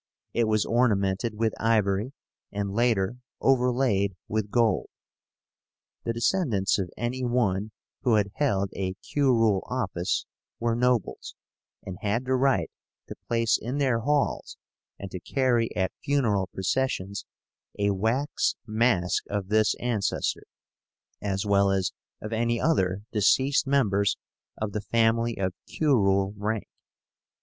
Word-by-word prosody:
It 115 - +2
was 110 -1 +1
ornamented 105 -2 +1
with 110 0 0
ivory, 110 +1 +1 0.4
and 100 -1 -3
later 115 -1 +1 0.2
overlaid 125 -7 +2
with 110 -1 -2
gold. 115 0 +2 1.2
The 115 - 0
descendants 115 - +1
of 95 -2 -2
any 125 +3 -2
one 110 -5 +1 0.3
who 120 -4 +3
had 100 -2 +1
held 100 -10 0
a 95 -1 -2
curule 115 -6 +2
office 100 -8 -1 0.3
were 115 0 0
nobles, 125 -2 0 0.5
and 90 -1 -7
had 110 +5 -1
the 130 - 0
right 130 -10 +2 0.4
to - - -6
place 115 -1 +2
in 125 +5 -3
their 130 -5 +2
halls 145 +4 0 0.4
and 100 -2 -8
to 90 - -5
carry 120 +2 +1
at 95 -1 0
funeral 115 -10 +1
processions 100 0 -2 0.5
a 100 0 +2
wax 115 +9 0
mask 110 -5 +1
of 100 -1 -3
this 110 0 +3
ancestor, 115 -5 -1 0.8
as 100 0 -2
well 100 -1 +3
as 95 -2 +1 0.3
of 105 +1 -5
any 115 +1 +1
other 100 - +1
deceased 130 +7 +3
members 100 -8 +2 0.4
of 110 -1 -3
the 105 - -3
family 115 +1 +1
of 95 -2 -1
curule 100 -9 +2
rank. 105 +1 -2
110 Hz, 125 wpm, -27 LUFS, 100-125 Hz, 1.2 s, who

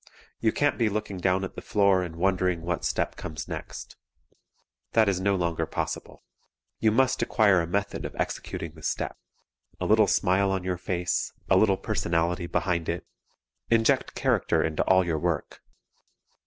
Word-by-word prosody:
You 110 - +2
can't 145 +2 +1
be 115 -2 +3
looking 105 -2 -3
down 95 +1 +1
at 95 - -5
the - - -8
floor 100 -3 +3
and 85 -2 -5
wondering 90 -1 +1
what 90 0 -2
step - - -1
comes 80 -4 -6
next. - - -7 1.0
That 110 -2 +4
is 95 -2 +1
no 100 +1 +2
longer 85 -3 -1
possible. - - -5 0.6
You 110 - +4
must 130 +3 +2
acquire 100 -5 +4
a 85 - -3
method 100 +3 -2
of - - -6
executing 85 - -3
the 80 0 -15
step; - - -2 0.6
a - - -2
little - - +5
smile 95 +2 +2
on 95 -1 -1
your 90 -1 -2
face; 90 0 -1 0.2
a - - +7
little 95 0 +4
personality 85 -4 -1
behind 85 -2 -1
it; 85 +1 -3 0.6
inject 115 -1 +2
character - - +1
into 80 -1 -1
all 95 -1 +4
your 80 -2 -1
work. 85 -2 -2
95 Hz, 165 wpm, -27 LUFS, 85-100 Hz, 1.0 s, a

